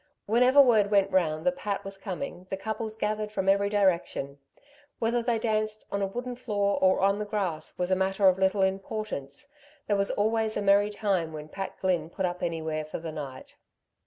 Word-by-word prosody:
Whenever 250 Hz, +5 st, +4 dB
word 225 Hz, -7 st, +6 dB
went 200 Hz, -1 st, +3 dB
round 160 Hz, -4 st, +1 dB
that 270 Hz, 0 st, +1 dB
Pat 205 Hz, -6 st, -3 dB
was 195 Hz, 0 st, -5 dB
coming 190 Hz, -1 st, -6 dB
the 190 Hz, -, -3 dB
couples 220 Hz, +2 st, -4 dB
gathered 215 Hz, 0 st, -2 dB
from 190 Hz, -3 st, -2 dB
every 200 Hz, +1 st, +3 dB
direction. 175 Hz, -8 st, 0 dB, 0.6 s
Whether 235 Hz, +1 st, +1 dB
they 235 Hz, 0 st, +1 dB
danced 215 Hz, -1 st, -1 dB
on 200 Hz, -, -1 dB
a 195 Hz, -, +1 dB
wooden 245 Hz, +5 st, -5 dB
floor 205 Hz, -5 st, 0 dB
or 185 Hz, 0 st, +4 dB
on 200 Hz, +1 st, +3 dB
the 210 Hz, -, -2 dB
grass 190 Hz, -7 st, -3 dB
was 180 Hz, +1 st, -1 dB
a -, -, +5 dB
matter 190 Hz, +1 st, +2 dB
of 185 Hz, 0 st, +4 dB
little 190 Hz, +1 st, +2 dB
importance. 190 Hz, -, -3 dB, 0.4 s
There 205 Hz, -, +1 dB
was 200 Hz, 0 st, +1 dB
always 220 Hz, +1 st, 0 dB
a -, -, -1 dB
merry 200 Hz, +1 st, +4 dB
time 195 Hz, -6 st, -1 dB
when 155 Hz, 0 st, -8 dB
Pat 195 Hz, +4 st, -6 dB
Glynn 175 Hz, -4 st, 0 dB
put 190 Hz, +2 st, -2 dB
up 175 Hz, 0 st, -3 dB
anywhere 160 Hz, -2 st, -2 dB
for 155 Hz, -, -6 dB
the 165 Hz, -1 st, -6 dB
night. 140 Hz, -4 st, -8 dB
195 Hz, 195 wpm, -28 LUFS, 180-215 Hz, 0.6 s, word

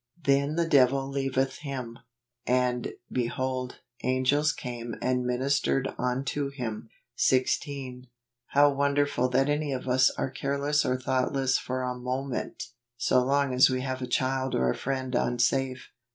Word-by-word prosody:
" 170 Hz, -, -31 dB
Then 140 Hz, +2 st, +2 dB
the 170 Hz, 0 st, +1 dB
devil 135 Hz, -2 st, +4 dB
leaveth 135 Hz, -1 st, -1 dB
him, 130 Hz, -5 st, -6 dB, 0.5 s
and, 125 Hz, -1 st, +1 dB, 0.2 s
behold, 130 Hz, +1 st, -2 dB, 0.2 s
angels 130 Hz, +4 st, +2 dB
came 120 Hz, -2 st, -6 dB
and 125 Hz, -1 st, 0 dB
ministered 135 Hz, +1 st, 0 dB
unto 135 Hz, +3 st, -1 dB
him." 120 Hz, -6 st, -5 dB, 0.3 s
16. 130 Hz, -1 st, 0 dB, 0.4 s
How 145 Hz, +1 st, +5 dB
wonderful 140 Hz, -2 st, +1 dB
that 135 Hz, +2 st, +2 dB
any 145 Hz, 0 st, 0 dB
of 130 Hz, -1 st, -4 dB
us 130 Hz, 0 st, +5 dB
are 130 Hz, -, -2 dB
careless 140 Hz, +2 st, 0 dB
or 125 Hz, -, +1 dB
thoughtless 130 Hz, +1 st, +1 dB
for 130 Hz, 0 st, -3 dB
a 125 Hz, 0 st, -1 dB
moment, 125 Hz, 0 st, -4 dB, 0.3 s
so 125 Hz, +1 st, +3 dB
long 140 Hz, 0 st, +1 dB
as 125 Hz, +1 st, +6 dB
we 130 Hz, 0 st, -1 dB
have 130 Hz, 0 st, -3 dB
a 125 Hz, -, -3 dB
child 130 Hz, +1 st, 0 dB
or 65 Hz, -1 st, +2 dB
a -, -, -3 dB
friend 130 Hz, -1 st, -3 dB
unsafe. 125 Hz, +2 st, 0 dB
130 Hz, 145 wpm, -28 LUFS, 125-140 Hz, 0.5 s, as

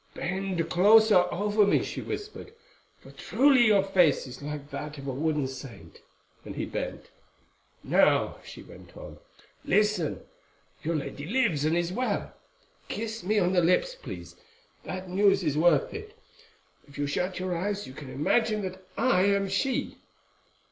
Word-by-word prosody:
"Bend 185 Hz, -2 st, -2 dB
closer 205 Hz, +1 st, +5 dB
over 210 Hz, +2 st, +2 dB
me," 200 Hz, -, +3 dB
she -, -, -5 dB
whispered, 425 Hz, +1 st, -7 dB, 0.4 s
"for -, -, -16 dB
truly 265 Hz, -3 st, +3 dB
your 205 Hz, -3 st, +4 dB
face 180 Hz, -7 st, +3 dB
is 130 Hz, +1 st, -10 dB
like 145 Hz, 0 st, -7 dB
that 150 Hz, +2 st, -6 dB
of 140 Hz, -, -9 dB
a 135 Hz, -, -3 dB
wooden 150 Hz, +1 st, 0 dB
saint," 125 Hz, -, -11 dB, 0.4 s
and -, -, -8 dB
he -, -, -3 dB
bent. -, -, -6 dB, 0.7 s
"Now," -, -, +3 dB
she -, -, -11 dB
went -, -, -15 dB
on, -, -, -10 dB, 0.4 s
"listen. 210 Hz, -5 st, +1 dB, 0.6 s
Your 165 Hz, +2 st, -2 dB
lady 145 Hz, 0 st, -5 dB
lives, 180 Hz, -, +1 dB
and 160 Hz, +2 st, +2 dB
is 175 Hz, +1 st, -1 dB
well—kiss 230 Hz, -, -5 dB
me 210 Hz, +4 st, 0 dB
on 185 Hz, -2 st, +2 dB
the 180 Hz, -, +4 dB
lips, 180 Hz, -, +2 dB
please, -, -, -9 dB, 0.5 s
that 185 Hz, 0 st, -6 dB
news 195 Hz, +1 st, +3 dB
is 150 Hz, -4 st, 0 dB
worth 155 Hz, -2 st, +3 dB
it. 435 Hz, +1 st, -9 dB, 0.7 s
If 140 Hz, -, -14 dB
you 145 Hz, -, -1 dB
shut 180 Hz, +6 st, -2 dB
your 185 Hz, -1 st, -2 dB
eyes 200 Hz, +4 st, -2 dB
you 130 Hz, -, -10 dB
can 140 Hz, -1 st, -10 dB
imagine 210 Hz, -, +1 dB
that 190 Hz, 0 st, -6 dB
I 225 Hz, -4 st, +3 dB
am 200 Hz, 0 st, +2 dB
she." 250 Hz, +7 st, -1 dB
185 Hz, 155 wpm, -27 LUFS, 155-210 Hz, 0.7 s, closer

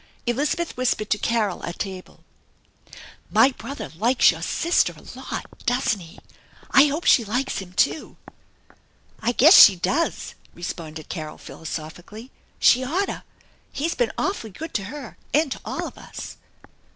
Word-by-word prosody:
Elizabeth 290 Hz, +7 st, -1 dB
whispered 240 Hz, -4 st, -1 dB
to 210 Hz, -, +2 dB
Carol 220 Hz, -5 st, 0 dB
at 170 Hz, -, -5 dB
table: 190 Hz, -2 st, -7 dB, 0.6 s
" -, -, -17 dB, 0.3 s
My 270 Hz, -, +6 dB
brother 240 Hz, -2 st, -8 dB
likes 235 Hz, +8 st, +4 dB
your -, -, -8 dB
sister 340 Hz, +1 st, +1 dB
a -, -, -16 dB
lot, -, -, -6 dB, 0.2 s
doesn't 245 Hz, -4 st, +1 dB
he? 165 Hz, -3 st, -13 dB, 0.5 s
I 275 Hz, -, +7 dB
hope 300 Hz, +4 st, -3 dB
she 240 Hz, -, +6 dB
likes 250 Hz, +5 st, -2 dB
him, 185 Hz, -2 st, -10 dB
too." 310 Hz, -, 0 dB, 0.5 s
" -, -, -32 dB
I 240 Hz, -, +1 dB
guess 295 Hz, +8 st, +7 dB
she 195 Hz, -3 st, +9 dB
does/' 260 Hz, -, -1 dB, 0.2 s
responded 160 Hz, -3 st, -7 dB
Carol 155 Hz, -3 st, -6 dB
philosophically. 170 Hz, +9 st, -8 dB, 0.2 s
" -, -, -37 dB
She 250 Hz, -, +5 dB
oughtta. 360 Hz, +10 st, -2 dB, 0.5 s
He's 320 Hz, +4 st, -2 dB
been 240 Hz, -3 st, 0 dB
awfully 375 Hz, -, -2 dB
good 320 Hz, -, -8 dB
to 195 Hz, -, -2 dB
her, 270 Hz, +1 st, -9 dB, 0.2 s
and 300 Hz, -2 st, +2 dB
to -, -, -5 dB
all -, -, -4 dB
of -, -, -12 dB
us." -, -, -9 dB
235 Hz, 155 wpm, -23 LUFS, 190-280 Hz, 0.6 s, she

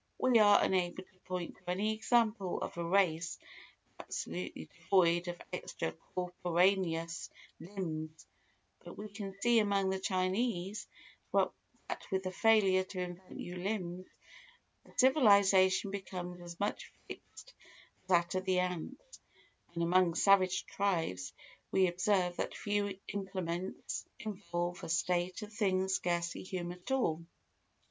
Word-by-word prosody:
We 250 Hz, -3 st, +4 dB
are 205 Hz, -1 st, +7 dB
unable 185 Hz, 0 st, 0 dB
to 185 Hz, 0 st, -29 dB
point 180 Hz, -2 st, -4 dB
to -, -, -11 dB
any 205 Hz, +4 st, +1 dB
example 220 Hz, -3 st, +1 dB
of -, -, -5 dB
a 170 Hz, -, -3 dB
race 170 Hz, -2 st, +2 dB, 0.6 s
absolutely 85 Hz, -2 st, -5 dB
devoid 170 Hz, -, +2 dB
of 175 Hz, 0 st, -4 dB
extra 80 Hz, -, -3 dB, 0.2 s
corporaneous 180 Hz, -1 st, +1 dB, 0.3 s
limbs, 160 Hz, -4 st, -5 dB, 0.6 s
but -, -, -10 dB
we 210 Hz, +1 st, -6 dB
can 200 Hz, -1 st, -7 dB
see 240 Hz, -1 st, +5 dB
among 200 Hz, -2 st, +2 dB
the 190 Hz, -, -1 dB
Chinese 190 Hz, +2 st, -1 dB, 0.4 s
that -, -, +3 dB, 0.6 s
with 190 Hz, 0 st, 0 dB
the 185 Hz, -, -3 dB
failure 195 Hz, -2 st, +4 dB
to 185 Hz, 0 st, -7 dB
invent 180 Hz, +1 st, -6 dB
new 180 Hz, +1 st, -6 dB
limbs, 185 Hz, -2 st, -3 dB, 0.8 s
a -, -, -17 dB
civilisation 200 Hz, -7 st, +5 dB
becomes 180 Hz, -2 st, -5 dB
as 175 Hz, -1 st, -9 dB
much 205 Hz, -, -2 dB, 0.2 s
fixed -, -, -11 dB, 0.5 s
as -, -, -35 dB
that 175 Hz, -2 st, +3 dB
of 185 Hz, 0 st, -1 dB
the 185 Hz, -1 st, +2 dB
ants; 180 Hz, -, -3 dB, 0.6 s
and 170 Hz, -, 0 dB
among 175 Hz, 0 st, +3 dB
savage 190 Hz, -1 st, +4 dB
tribes 160 Hz, -, -1 dB, 0.4 s
we 190 Hz, -, +4 dB
observe 180 Hz, 0 st, +1 dB
that -, -, -2 dB
few 205 Hz, -2 st, -1 dB
implements 185 Hz, -2 st, -4 dB
involve 175 Hz, -4 st, -4 dB
a -, -, -5 dB
state 175 Hz, +4 st, 0 dB
of 210 Hz, +1 st, -9 dB
things 190 Hz, -3 st, +1 dB
scarcely 175 Hz, -2 st, -1 dB
human 180 Hz, -1 st, -5 dB
at 180 Hz, -, -10 dB
all. 170 Hz, -12 st, +1 dB
185 Hz, 130 wpm, -33 LUFS, 175-200 Hz, 0.8 s, are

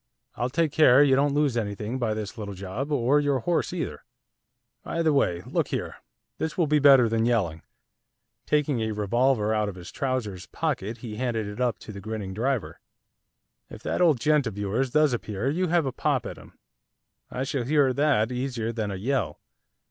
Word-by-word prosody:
I'll 120 Hz, -, -1 dB
take 160 Hz, +2 st, +1 dB
care 145 Hz, -3 st, +6 dB
you 135 Hz, -2 st, +4 dB
don't 140 Hz, +1 st, +2 dB
lose 145 Hz, -4 st, +2 dB
anything 105 Hz, +2 st, -3 dB
by 110 Hz, -3 st, 0 dB
this 105 Hz, -3 st, -5 dB
little 100 Hz, -2 st, -6 dB
job, 100 Hz, +10 st, -5 dB
or 140 Hz, +1 st, +3 dB
your 140 Hz, -3 st, +1 dB
horse 175 Hz, +7 st, 0 dB
either. 165 Hz, -, -4 dB, 0.8 s
By 165 Hz, -, -2 dB
the 155 Hz, -2 st, +3 dB
way, 90 Hz, -11 st, +1 dB
look -, -, -1 dB
here, -, -, -4 dB, 0.4 s
this 160 Hz, -, -3 dB
will 170 Hz, -, +3 dB
be 150 Hz, 0 st, +3 dB
better 135 Hz, -4 st, +7 dB
than 115 Hz, +1 st, +1 dB
yelling.' 90 Hz, -10 st, 0 dB, 0.9 s
Taking 145 Hz, -5 st, +1 dB
a 110 Hz, -1 st, -1 dB
revolver 110 Hz, +2 st, +1 dB
out 105 Hz, -1 st, 0 dB
of 100 Hz, -, -8 dB
his 90 Hz, -2 st, -10 dB
trousers' 115 Hz, -9 st, -3 dB
pocket 110 Hz, +5 st, -3 dB
he 105 Hz, -2 st, -6 dB
handed 115 Hz, -3 st, -1 dB
it 105 Hz, +4 st, -6 dB
up 125 Hz, -2 st, +1 dB
to -, -, -9 dB
the 100 Hz, -1 st, -9 dB
grinning 110 Hz, -3 st, -5 dB
driver. 125 Hz, +3 st, -2 dB, 0.9 s
'If -, -, -11 dB
that -, -, -1 dB
old 160 Hz, -8 st, +4 dB
gent 150 Hz, 0 st, +2 dB
of 105 Hz, -, -6 dB
yours 105 Hz, +6 st, -1 dB
does 150 Hz, 0 st, +3 dB
appear, 110 Hz, +2 st, -2 dB
you 180 Hz, +4 st, 0 dB
have 170 Hz, -2 st, +2 dB
a 135 Hz, -, -1 dB
pop -, -, -1 dB
at -, -, -7 dB
him, -, -, -17 dB, 0.7 s
I 130 Hz, -, -3 dB
shall 135 Hz, -1 st, -2 dB
hear 140 Hz, -1 st, +3 dB
that 135 Hz, -5 st, +2 dB
easier 125 Hz, -3 st, -2 dB
than 110 Hz, -2 st, -2 dB
a 100 Hz, -, -4 dB
yell. 105 Hz, -, -2 dB
125 Hz, 195 wpm, -26 LUFS, 105-140 Hz, 0.9 s, better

